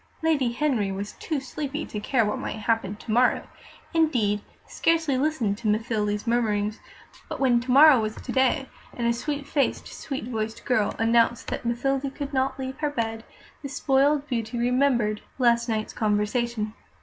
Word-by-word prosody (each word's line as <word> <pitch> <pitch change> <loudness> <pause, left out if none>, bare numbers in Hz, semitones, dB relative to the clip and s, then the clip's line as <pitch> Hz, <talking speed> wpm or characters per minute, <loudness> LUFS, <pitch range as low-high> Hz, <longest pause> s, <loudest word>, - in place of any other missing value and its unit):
Lady 290 -7 +2
Henry 240 -7 0
was 200 +2 -4
too 310 -3 -2
sleepy 280 +3 -4
to 210 - -5
care 230 +2 +1
what 210 - -2
might - - -4
happen 220 -2 -1
to 215 - -7
morrow 245 +3 +3 0.5
indeed, 240 -11 +2 0.2
scarcely 325 -4 +1
listened 255 -7 0
to 230 - -3
Mathilde's 210 -1 0
murmurings; 215 -3 0 0.5
but - - -5
when 250 -3 +4
to 245 +2 -8
morrow 280 +1 +8
was 215 0 -3
to - - -7
day, 265 +1 +2 0.3
and 240 - -2
a 235 - +3
sweet 285 +4 -3
faced, 285 -1 0
sweet 270 -3 -5
voiced 225 -2 -4
girl 220 -6 +1
announced 230 +1 +2
that - - -4
Mathilde 270 +3 -1
could 285 -1 -5
not 260 0 0
leave 265 0 -5
her 300 - 0
bed, 225 -5 -3 0.4
the 280 - -6
spoiled 280 +2 +2
beauty 230 -2 -3
remembered 240 -3 +1 0.2
last 235 -2 +3
night's 215 -1 -2
conversation. 215 +1 0
240 Hz, 165 wpm, -25 LUFS, 220-275 Hz, 0.5 s, morrow